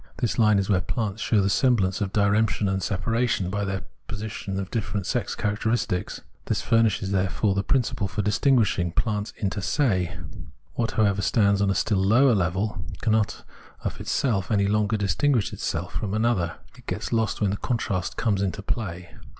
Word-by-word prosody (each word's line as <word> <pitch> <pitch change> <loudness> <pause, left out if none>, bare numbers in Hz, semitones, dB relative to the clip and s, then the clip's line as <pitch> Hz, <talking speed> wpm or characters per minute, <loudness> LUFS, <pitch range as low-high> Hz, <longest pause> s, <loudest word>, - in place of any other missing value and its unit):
This 120 0 -1
line 105 -2 +5
is 100 -1 +1
where 95 -3 +2
plants 110 -1 -3
show 105 -2 +2
the 100 - +1
semblance 105 -6 +2
of 100 -2 -1
diremption 100 0 +2
and 95 0 0
separa 115 +6 0
tion 90 -4 0
by 100 +1 -1
the 95 -2 -3 0.2
possession 105 -2 -4
of 95 -1 -5
different 105 -4 -2
sex - - -1
characters; 110 +3 0 0.6
this - - -1
furnishes, 115 -4 +2
therefore, 95 +2 +1
the 100 - +1
principle 120 -4 0
for 95 +2 -3
distinguishing 105 -4 +2
plants 105 +3 -1
inter 100 -1 -2
se. 95 - 0 0.6
What, 115 -2 -1
however, 100 -3 +2
stands 100 -1 +3
on 100 - +2
a 95 - +1
still 105 -4 +1
lower 120 +6 +5
level 95 +2 -1 0.2
cannot 110 -2 +1 0.4
of - - -4
itself 105 -9 0
any 100 -3 +2
longer 105 +1 +1
distinguish 115 +4 +1
itself - - -3
from 95 +7 -2
another; 110 -7 +1 0.2
it - - -18
gets - - -3
lost 110 -2 0
when 105 -3 +1
the 100 - -2
contrast 105 -7 -2
comes 100 -4 +1
into 100 +1 -2
play. 90 -5 -4
100 Hz, 175 wpm, -25 LUFS, 95-110 Hz, 0.6 s, line